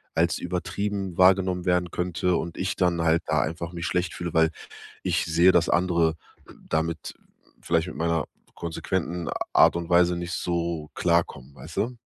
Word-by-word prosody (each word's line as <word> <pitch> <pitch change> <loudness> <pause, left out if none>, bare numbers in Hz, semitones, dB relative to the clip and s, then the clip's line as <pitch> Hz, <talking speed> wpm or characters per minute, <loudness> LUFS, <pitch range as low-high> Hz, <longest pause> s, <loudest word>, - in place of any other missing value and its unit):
als 85 +1 +2
übertrieben 95 +1 -3
wahrgenommen 95 -1 +4
werden 90 -1 +1
könnte 90 0 0
und 85 - -5
ich 95 +1 -2
dann 90 -2 +1
halt 80 +1 +2
da - - +2
einfach 80 +3 -4
mich 85 -1 -4
schlecht 90 0 -1
fühle, 85 -2 -5
weil 80 0 +4 0.5
ich - - 0
sehe, 85 +3 +5
dass 85 -2 +3
andere 85 -1 +2 0.5
damit 80 +1 -2 0.5
vielleicht 85 +1 +1
mit - - -8
meiner 85 -1 0 0.3
konsequenten 85 +1 -3 0.2
Art - - +6
und 85 -1 -4
Weise 90 0 +4
nicht 85 +1 -5
so 85 -2 -2
klarkommen, 85 -6 0
weißt 65 - -9
du? 125 +2 -1
85 Hz, 160 wpm, -25 LUFS, 85-90 Hz, 0.5 s, Art